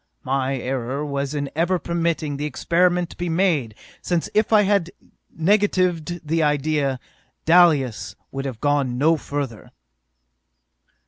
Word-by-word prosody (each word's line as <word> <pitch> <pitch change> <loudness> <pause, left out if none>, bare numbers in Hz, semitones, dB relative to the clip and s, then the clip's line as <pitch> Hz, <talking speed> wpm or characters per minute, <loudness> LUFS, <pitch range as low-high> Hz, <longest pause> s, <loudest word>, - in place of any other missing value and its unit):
My 135 0 -1
error 130 +2 -3
was 140 0 -3
in 140 -1 -3
ever 175 +3 +1
permitting 165 -4 -2
the 145 - -3
experiment 175 +4 +1
to - - -13
be 175 0 -3
made, 160 - +1 0.3
since 175 -2 -2
if 215 +1 +2
I 215 -1 +6
had 200 -3 +1 0.4
negatived 175 -3 0
the 165 +2 +1
idea. 145 -2 0 0.5
Dalis 140 - +3 0.2
would 135 0 -4
have 130 -5 -5
gone 140 -3 0
no 160 +5 +4
further! 140 -7 -5
150 Hz, 130 wpm, -22 LUFS, 135-175 Hz, 0.5 s, I